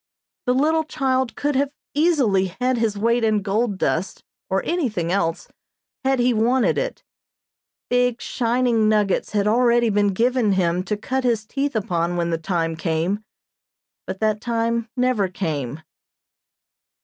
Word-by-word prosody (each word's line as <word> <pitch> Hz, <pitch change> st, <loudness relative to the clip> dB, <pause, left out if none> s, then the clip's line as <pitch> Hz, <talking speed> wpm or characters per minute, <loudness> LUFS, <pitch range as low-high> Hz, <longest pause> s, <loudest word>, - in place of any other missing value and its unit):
The 250 Hz, -, +3 dB
little 315 Hz, +4 st, +2 dB
child 260 Hz, -6 st, -1 dB
could 290 Hz, -1 st, -1 dB
have 275 Hz, +1 st, +2 dB, 0.2 s
easily 245 Hz, -, +2 dB
had 255 Hz, -1 st, +1 dB
his 220 Hz, -3 st, 0 dB
weight 230 Hz, +3 st, +1 dB
in 215 Hz, -2 st, +2 dB
gold 205 Hz, +1 st, 0 dB
dust, 180 Hz, 0 st, -1 dB, 0.3 s
or 190 Hz, 0 st, 0 dB
anything 225 Hz, -, -1 dB
else, 165 Hz, -4 st, -1 dB, 0.6 s
had 265 Hz, 0 st, +2 dB
he 245 Hz, 0 st, +3 dB
wanted 240 Hz, +3 st, +2 dB
it. -, -, -4 dB, 0.8 s
Big, 245 Hz, -1 st, +1 dB
shining 235 Hz, -2 st, +1 dB
nuggets 210 Hz, -2 st, +1 dB
had 205 Hz, -1 st, +1 dB
already 235 Hz, 0 st, +3 dB
been 205 Hz, 0 st, +2 dB
given 230 Hz, +2 st, +2 dB
him 180 Hz, -1 st, +1 dB
to 210 Hz, -, -2 dB
cut 260 Hz, +5 st, -2 dB
his 230 Hz, -3 st, +1 dB
teeth 275 Hz, +3 st, -2 dB
upon 175 Hz, -5 st, -1 dB
when 170 Hz, 0 st, 0 dB
the 165 Hz, -, -1 dB
time 165 Hz, -1 st, -1 dB
came, 165 Hz, +5 st, -1 dB, 0.8 s
but 190 Hz, -, -5 dB
that 215 Hz, -1 st, +1 dB
time 230 Hz, -1 st, -1 dB
never 250 Hz, -6 st, +2 dB
came. 160 Hz, -6 st, -4 dB
220 Hz, 145 wpm, -22 LUFS, 190-250 Hz, 0.8 s, The